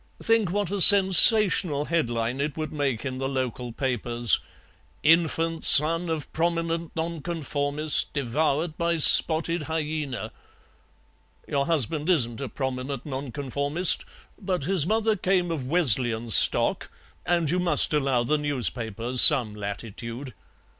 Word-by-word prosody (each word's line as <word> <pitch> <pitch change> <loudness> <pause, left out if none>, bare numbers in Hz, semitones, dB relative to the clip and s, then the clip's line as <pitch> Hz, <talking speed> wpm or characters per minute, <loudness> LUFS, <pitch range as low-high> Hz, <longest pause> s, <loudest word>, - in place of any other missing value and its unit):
Think 225 -4 0
what 205 -2 -4
a 200 -1 -3
sensational 190 -5 +6
headline 120 -6 -4
it 150 +1 -5
would 155 0 -7
make 140 -5 -4
in 130 -1 -7
the 135 0 -5
local 125 -2 -6
papers: 120 -2 0 0.6
'Infant 165 0 -1
son 165 +3 +5
of 160 -3 -6
prominent 165 0 -4
Nonconformist 155 -3 -3
devoured 150 +4 -4
by 170 0 -2
spotted 160 +1 +5
hyaena.' 155 -4 -6 1.2
Your 140 -1 -3
husband 155 0 -3
isn't 120 -10 -1
a 135 - -7
prominent 130 +1 -7
Nonconformist, 140 +4 0 0.4
but 185 -5 -5
his 175 -1 -1
mother 220 +1 -1
came 180 -2 -2
of 140 -6 -6
Wesleyan 120 -7 -1
stock, - - +3 0.3
and 170 -4 -2
you 180 - -2
must 175 -3 +2
allow 135 -5 -1
the 150 +5 -2
newspapers 125 -4 -1
some 115 -5 +6
latitude." 115 +5 -9
150 Hz, 120 wpm, -23 LUFS, 130-170 Hz, 1.2 s, sensational